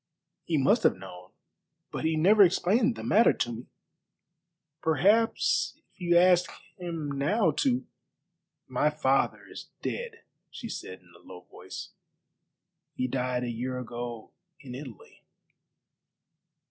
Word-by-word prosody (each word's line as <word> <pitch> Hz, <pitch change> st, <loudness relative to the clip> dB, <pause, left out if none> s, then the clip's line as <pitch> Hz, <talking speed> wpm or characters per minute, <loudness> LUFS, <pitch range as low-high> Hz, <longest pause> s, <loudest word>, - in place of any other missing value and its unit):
"He -, -, 0 dB
must -, -, +3 dB
have -, -, +3 dB
known, 90 Hz, +1 st, -11 dB, 0.6 s
but -, -, -4 dB
he 160 Hz, 0 st, +1 dB
never 200 Hz, +7 st, +5 dB
explained 210 Hz, +6 st, +4 dB
the -, -, -8 dB
matter 225 Hz, +3 st, +5 dB
to 120 Hz, -, -2 dB
me." 120 Hz, +1 st, -8 dB, 1.1 s
"Perhaps 200 Hz, -, +2 dB
if -, -, -26 dB
you 175 Hz, -1 st, +3 dB
asked 180 Hz, 0 st, +5 dB, 0.3 s
him 165 Hz, -5 st, -4 dB
now 185 Hz, +4 st, +2 dB
to 125 Hz, -1 st, +1 dB, 0.4 s
" 170 Hz, -1 st, -56 dB
"My 150 Hz, -, +4 dB
father 135 Hz, -3 st, 0 dB
is -, -, -10 dB
dead," 460 Hz, -2 st, -5 dB, 0.3 s
she 230 Hz, -, -8 dB
said 95 Hz, -, -7 dB
in 90 Hz, -1 st, -22 dB
a -, -, -17 dB
low 90 Hz, -1 st, -12 dB
voice; -, -, -10 dB, 1.1 s
"he 130 Hz, -, -1 dB
died 125 Hz, -1 st, -1 dB
a 120 Hz, -, -2 dB
year 125 Hz, +2 st, -4 dB
ago 120 Hz, -2 st, -6 dB, 0.3 s
in 130 Hz, -3 st, -10 dB
Italy." 130 Hz, -4 st, -11 dB
150 Hz, 135 wpm, -28 LUFS, 125-180 Hz, 1.1 s, never